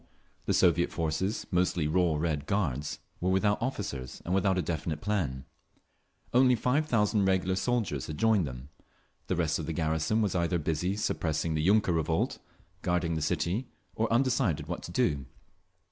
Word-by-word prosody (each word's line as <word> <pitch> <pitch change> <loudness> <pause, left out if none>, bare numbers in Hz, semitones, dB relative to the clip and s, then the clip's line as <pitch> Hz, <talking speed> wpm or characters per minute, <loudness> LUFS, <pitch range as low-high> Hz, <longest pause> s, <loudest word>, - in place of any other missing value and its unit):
The - - +2
Soviet 85 -1 +3
forces, 85 +6 -1
mostly 90 -3 +1
raw 85 0 +2
Red 75 -2 -1
Guards, 75 -8 -1 0.2
were 90 - 0
without 105 +2 +2
officers 100 - -4
and 90 - -1
without 95 0 +2
a - - +2
definite 80 -1 -3
plan. 75 -10 -2 0.9
Only 125 0 +5
five 140 +7 +1
thousand 105 -4 +2
regular 95 -1 +2
soldiers 105 - -1
had 75 - -5
joined 110 -6 +3
them; 65 +1 -8 0.6
the - - 0
rest 85 -2 0
of 80 - -5
the 80 - -2
garrison 80 +6 0
was 100 - 0
either 85 0 +1
busy 80 +4 -1
suppressing 80 -5 -1
the 80 - 0
yunker 100 0 +3
revolt, 80 0 0 0.4
guarding 90 -2 0
the 80 - -2
city, 95 - -1 0.3
or 110 0 0
undecided 120 - +2
what - - -4
to - - -8
do. 70 -2 +1
90 Hz, 160 wpm, -29 LUFS, 80-105 Hz, 0.9 s, Only